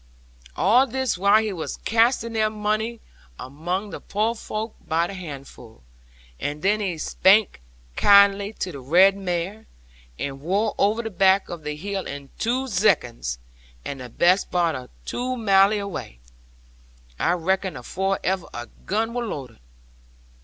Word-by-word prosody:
'All 240 +9 +4
this 260 0 -1
while 200 +4 +4
he 215 -2 -2
was 165 -3 -5
casting 230 0 +1
their 215 -1 +2
money 215 +2 -2 0.4
among 175 +9 -4
the - - -6
poor 215 +3 0
folk 220 -1 -5
by 165 +1 +2
the 200 - -6
handful; 140 - -10 0.6
and 150 +2 -4
then 205 +2 +3
he 190 -5 -2
spak 190 - +3 0.4
kaindly 200 0 +5
to 185 - -3
the 140 - -8
red 180 +9 +5
mare, 190 +3 -4 0.5
and 135 -1 -5
wor 200 +7 0
over 215 +4 +2
the 225 - -5
back 190 +1 +3
of 170 -2 -6
the 150 0 -4
hill 195 +4 -4
in 140 -1 -8
two 250 +3 0
zeconds, 170 - +1 0.5
and 130 -4 -7
best 180 +3 +3
part 170 -2 +1
of 130 -2 -7 0.2
two 255 +1 -3
maile 200 -2 +4
away, 200 - -6 1.0
I 175 - +2
reckon, 185 -1 -1
afore 190 +10 -2
ever 185 -1 -1
a 120 0 -6 0.2
gun 225 +3 0
wor 245 0 -2
loaded.' 130 - -7
195 Hz, 145 wpm, -23 LUFS, 165-215 Hz, 1.0 s, kaindly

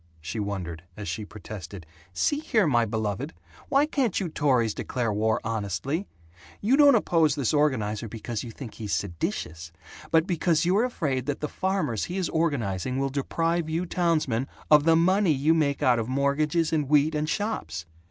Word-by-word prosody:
she 85 +8 -5
wondered, 95 -6 -4 0.2
as 105 -1 -6
she 110 - -3
protested, 100 -4 -9 0.3
"See 290 - +1
here, 220 - +2
my 120 -6 +3
beloved, 110 -5 -3 0.3
why 280 +2 +4
can't 270 - 0
you 185 - -2
Tories 130 -8 +2
declare 120 -4 -2
war 110 +1 +1
honestly? 115 - -2 0.5
You 230 +6 +3
don't 285 -2 +7
oppose 165 -8 +3
this 140 -4 0
organizer 115 -8 +1
because 110 +1 -5
you 120 - -7
think 115 -1 -9
he's 105 -3 -5
seditious 85 -2 -4 0.4
but 160 0 +4
because 170 -2 +1
you're 195 +7 +3
afraid 140 - -2
that 145 - -2
the 150 - -2
farmers 190 - -1
he 180 - -5
is 185 -3 -1
organizing 130 - -1
will 135 0 0
deprive 165 +4 -1
you 165 +3 -1
townsmen 155 -9 0 0.2
of 150 -1 +7
the 165 0 +5
money 185 +1 +3
you 145 +4 +3
make 145 -3 +1
out 125 -3 +4
of 115 - -2
mortgages 150 +4 +1
and 150 -4 0
wheat 150 +1 +4
and 150 0 -1
shops. 85 - -3
140 Hz, 170 wpm, -26 LUFS, 110-165 Hz, 0.5 s, don't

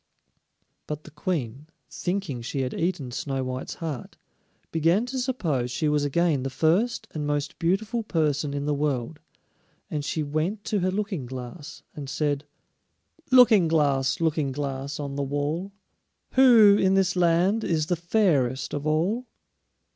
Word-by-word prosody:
But 150 0 -5
the 155 - -13
Queen, 150 - -3 0.2
thinking 180 -9 -3
she 130 +3 -3
had 130 -1 -2
eaten 165 -7 -2
Snow 135 +1 -3
white's 130 +1 -5
heart, 155 -7 -6 0.5
began 165 +7 +2
to 260 +1 -4
suppose 165 - -1
she 155 +5 -1
was 150 -1 +2
again 150 0 +1
the 135 - -2
first 195 - +1
and 150 -2 -3
most 145 -1 -2
beautiful 210 +7 0
person 150 -7 0
in 140 0 -2
the 150 - +1
world; 145 0 -2 0.7
and 150 -2 -2
she 155 +1 -2
went 155 +8 -2
to 210 - 0
her 185 0 +1
Looking 190 - -3
glass 130 +4 -8
and 140 -3 -6
said: 145 0 -1 0.9
"Looking 230 -8 +7
glass, 140 -4 +2
Looking 155 -4 0
glass, 140 0 -4
on 140 -1 -4
the - - 0
wall, 145 +7 -2 0.6
Who 230 -6 +7
in 190 0 +3
this 190 -1 +2
land 180 +5 +3
is 155 -3 0
the 175 - 0
fairest 150 - +1
of 145 0 -3
all?" 185 +11 0
155 Hz, 150 wpm, -26 LUFS, 140-185 Hz, 0.9 s, Looking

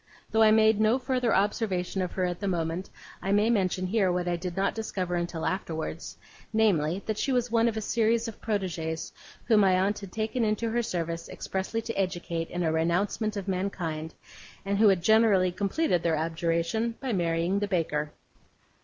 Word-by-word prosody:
Though 220 - +3
I 220 - +7
made 220 0 +5
no 220 +3 +4
further 250 -2 0
observation 195 -2 0
of 180 - -3
her 185 - 0
at 175 -1 -3
the 200 - -3
moment, 170 0 -2 0.3
I 195 - -2
may 210 +3 +3
mention 185 -4 +1
here 190 -1 +2
what 180 0 -1
I 175 - +1
did 175 +1 -5
not 195 +1 +1
discover 190 -5 -3
until 175 -2 -2
afterwards, 165 -3 -4 0.3
namely, 195 -5 +2
that 215 -1 -2
she 275 - 0
was 245 -2 0
one 230 0 +3
of 225 -1 -1
a - - -1
series 230 +2 +1
of 225 - -8
protegees 175 -7 -3 0.3
whom 220 -3 +4
my 190 -2 +4
aunt 200 +2 0
had 200 -3 -9
taken 220 +3 -1
into 220 +1 0
her 240 +1 +1
service 170 -5 -3
expressly 195 +4 -3
to 230 - -4
educate 175 -3 -2
in 175 0 -2
a 160 - +1
renouncement 195 +7 0
of 200 -1 -5
mankind, 175 -5 -3 0.5
and 200 0 0
who 220 - +6
had 190 -4 +3
generally 215 -4 +4
completed 195 - 0
their 165 -2 +1
abjuration 170 +7 -1
by 260 -4 -2
marrying 170 +1 +1
the 205 - -1
baker. 155 -5 -1
195 Hz, 190 wpm, -28 LUFS, 175-220 Hz, 0.5 s, I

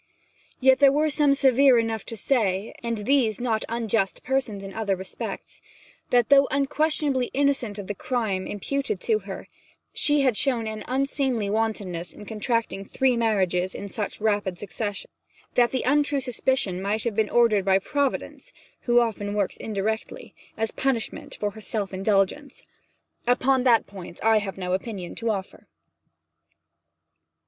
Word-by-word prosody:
Yet 265 0 +5
there 280 -1 +7
were 300 +2 +2
some 290 -1 +4
severe 270 -1 +5
enough 225 -2 -1
to 230 - -5
say 205 -5 0
and 235 -1 -2
these 225 0 +1
not 230 -3 0
unjust 225 -4 -1
persons 245 -7 -1
in 195 0 -8
other 210 -3 -1
respects 190 0 -7 0.5
that 245 -2 +3
though 275 0 +6
unquestionably 280 -1 +1
innocent 270 -7 +1
of 200 - -6
the 205 - -3
crime 205 -4 -2
imputed 270 +2 -2
to 220 -2 +1
her, 195 -1 -8 0.5
she 295 -1 +3
had 260 -4 +2
shown 240 -2 0
an 215 -1 -5
unseemly 260 -5 0
wantonness 205 -6 -2
in 210 - -11
contracting 220 -2 -1
three 255 +5 +1
marriages 190 -5 +1
in 200 - -6
such 205 +1 -4
rapid 205 -4 0
succession; 205 +1 -5 0.4
that 240 -1 +4
the 260 - -2
untrue 290 +1 +2
suspicion 250 -7 -1
might 205 +2 -1
have 235 -4 -2
been 220 -1 +1
ordered 230 -4 +3
by 190 0 +4
Providence 285 - -2 0.4
(who 240 0 +5
often 210 -3 -1
works 200 -2 0
indirectly) 220 +1 -4 0.2
as 225 0 -1
a - - -29
punishment 265 -4 -2
for 205 -1 -1
her 220 +2 -11
self 205 -2 -3
indulgence. 195 +8 0 0.6
Upon 255 +2 +3
that 235 -3 +5
point 185 -3 -10
I 220 0 +5
have 195 -2 -6
no 180 -1 -2
opinion 190 -2 -4
to 230 0 -2
offer. 195 -3 -4
225 Hz, 155 wpm, -25 LUFS, 200-260 Hz, 0.6 s, there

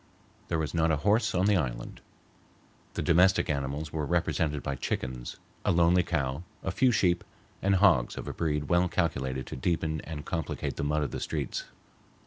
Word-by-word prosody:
There 85 - 0
was 80 -2 -2
not 80 -1 +2
a 80 - +3
horse 110 +1 +3
on 90 +1 +3
the 105 0 +4
island. - - -3 0.9
The - - -1
domestic 90 0 +4
animals 70 +2 -3
were 80 -1 -1
represented 80 -2 0
by 70 - -2
chickens, 65 -2 -4 0.3
a - - +2
lonely 85 +1 +4
cow, 70 -4 -1 0.2
a 95 - -1
few 125 +7 +3
sheep, 90 -5 +2 0.4
and 100 0 +3
hogs 90 -11 +4
of - - -6
a - - -3
breed 75 -2 -1
well 90 0 +3
calculated 65 -8 -1
to - - -7
deepen 80 +2 -1
and 75 -2 -7
complicate 85 -5 -3
the - - -2
mud 75 +1 +1
of 70 - -3
the - - -4
streets. 75 -5 -3
80 Hz, 180 wpm, -29 LUFS, 70-90 Hz, 0.9 s, the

